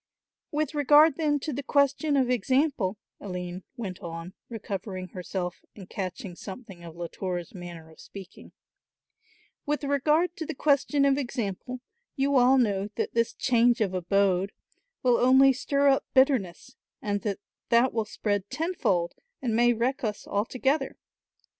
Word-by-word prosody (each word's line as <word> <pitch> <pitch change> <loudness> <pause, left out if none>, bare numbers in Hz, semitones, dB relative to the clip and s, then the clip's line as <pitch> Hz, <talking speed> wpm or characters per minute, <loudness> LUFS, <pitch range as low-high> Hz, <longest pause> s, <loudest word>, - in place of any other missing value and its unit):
"With 300 -1 -1
regard 295 +1 +5
then 295 -2 +1
to 305 - -3
the 280 - -3
question 280 +1 +2
of 260 -2 +3
example," 250 -3 +1 0.2
Aline 180 -2 -5 0.2
went 195 -6 -5
on, 165 +2 -7 0.2
recovering 195 -4 -5
herself 180 0 -5
and 195 -4 -11
catching 185 -1 -5
something 195 -2 -10
of 165 -1 -10
Latour's 175 0 -5
manner 175 -3 -9
of 160 - -19
speaking, 195 -1 -12 1.2
"with 295 0 -1
regard 300 +5 +2
to 320 - -4
the 320 - -4
question 285 0 +2
of 275 0 +3
example, 245 -1 -4 0.3
you 280 0 +1
all 255 +1 +6
know 205 -5 +1
that - - -2
this 230 0 +1
'change 240 -1 +3
of 200 -4 0
abode' 190 +1 +1 0.5
will 245 -2 +4
only 265 +2 +6
stir 280 +2 +2
up 270 - +3
bitterness 255 - +2 0.2
and 205 -1 -2
that 205 -3 -2 0.3
that 240 +2 +4
will 225 -1 0
spread 205 -2 -2
tenfold 305 - 0 0.3
and 235 -4 -1
may 240 +1 +5
wreck 240 +4 -1
us 210 -2 -3
altogether. 265 +7 -1
235 Hz, 145 wpm, -27 LUFS, 190-275 Hz, 1.2 s, all